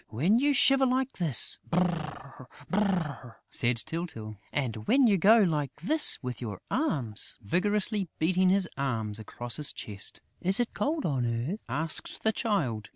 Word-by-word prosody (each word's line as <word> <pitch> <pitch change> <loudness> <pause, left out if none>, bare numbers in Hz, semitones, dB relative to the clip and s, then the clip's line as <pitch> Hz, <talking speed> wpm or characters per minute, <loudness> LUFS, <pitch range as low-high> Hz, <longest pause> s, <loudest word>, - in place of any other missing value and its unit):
"When 170 - +2
you 290 +2 +2
shiver 270 +1 +5
like 260 +1 -1
this: 155 -9 +3
Brrr! 155 -7 -3 0.2
Brrr!" 180 - -1 0.2
said 120 0 +2
Tyltyl. 115 -7 -5 0.2
"And 115 -6 -3
when 270 0 +4
you 200 -5 +3
go 215 +6 +6
like 150 -6 -1
this 300 - +4
with 125 -1 -5
your 105 -5 -5
arms," 140 - 0
vigorously 205 - 0
beating 185 +3 +2
his 190 -1 +2
arms 110 -6 -2
across 120 +2 -5
his 150 -2 +1
chest. 100 -2 -7 0.2
"Is 190 +4 +1
it 240 - -1
cold 305 0 -1
on 130 -6 0 0.2
earth?" 210 - -6
asked 155 +5 -1
the 220 - +3
Child. 145 - -2
165 Hz, 155 wpm, -28 LUFS, 125-210 Hz, 0.2 s, go